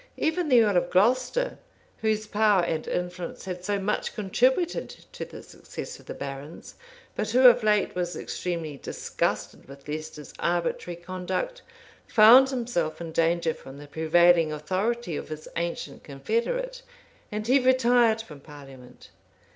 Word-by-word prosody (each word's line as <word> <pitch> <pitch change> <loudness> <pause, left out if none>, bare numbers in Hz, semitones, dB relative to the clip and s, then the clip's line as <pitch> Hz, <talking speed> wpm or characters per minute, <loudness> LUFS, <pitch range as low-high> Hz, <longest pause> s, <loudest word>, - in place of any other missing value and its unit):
Even 320 0 0
the 245 -3 +6
earl 205 -4 +2
of 175 0 +1
Glocester, 255 - +1 0.4
whose 215 -1 0
power 210 -3 +3
and 160 -2 -2
influence 180 0 -4
had 180 -1 -6
so 205 +2 0
much 200 +2 -2
contributed 255 - +1 0.2
to - - -6
the - - -11
success - - -9
of - - -19
the - - -6
barons, 140 +3 -8 0.4
but 215 - -2
who 250 +4 +3
of 245 -1 +8
late 210 -1 +2
was 180 -1 -3
extremely 165 -5 -4
disgusted - - -3
with 140 +1 -13
Leicester's 150 -1 -7
arbitrary 175 0 -1
conduct, 185 - -4 0.5
found 245 +5 +8
himself 230 - -2
in 165 -1 -6
danger 165 0 +1
from 135 +1 -12
the 145 - -10
prevailing 160 +2 +3
authority 185 +6 -2
of - - -6
his 155 0 -7
ancient 170 0 -4
confederate; 235 - -2 0.5
and 210 0 -3
he 260 +4 +4
retired 245 -3 +3
from 150 -9 -12
parliament. 135 -4 -14
185 Hz, 145 wpm, -26 LUFS, 160-235 Hz, 0.5 s, of